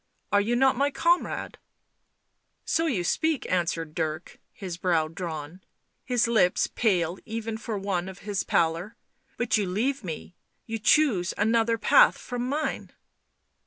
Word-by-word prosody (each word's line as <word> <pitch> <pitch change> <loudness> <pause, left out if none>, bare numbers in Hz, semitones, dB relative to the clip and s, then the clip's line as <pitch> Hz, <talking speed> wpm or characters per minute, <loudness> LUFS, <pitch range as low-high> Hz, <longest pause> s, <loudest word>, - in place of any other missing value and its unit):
Are 205 - +4
you 230 +4 0
not 265 +2 +4
my 280 +3 +2
comrade 340 +4 0 0.4
?" - - -50
" - - -49
So 330 +1 +1
you 210 - 0
speak," 315 - 0
answered 170 -3 -1
Dick, 155 0 -4
his 185 -4 -7
brow 170 -3 +1
drawn, 165 0 -6 0.4
his 245 -3 +1
lips 215 -6 +3
pale 180 -6 0
even 225 0 -4
for 220 -1 -4
one 190 -2 -2
of 190 - -10
his 205 -2 -1
pallor. 170 +6 0 0.2
" - - -40
But 240 -2 +1
you 205 -3 0
leave 240 +8 -1
me.... 170 0 -7 0.3
You 225 0 -4
choose 210 - +3
another 230 +2 +2
path - - +5
from 245 0 -4
mine." 300 +2 -3
205 Hz, 155 wpm, -26 LUFS, 175-240 Hz, 0.4 s, path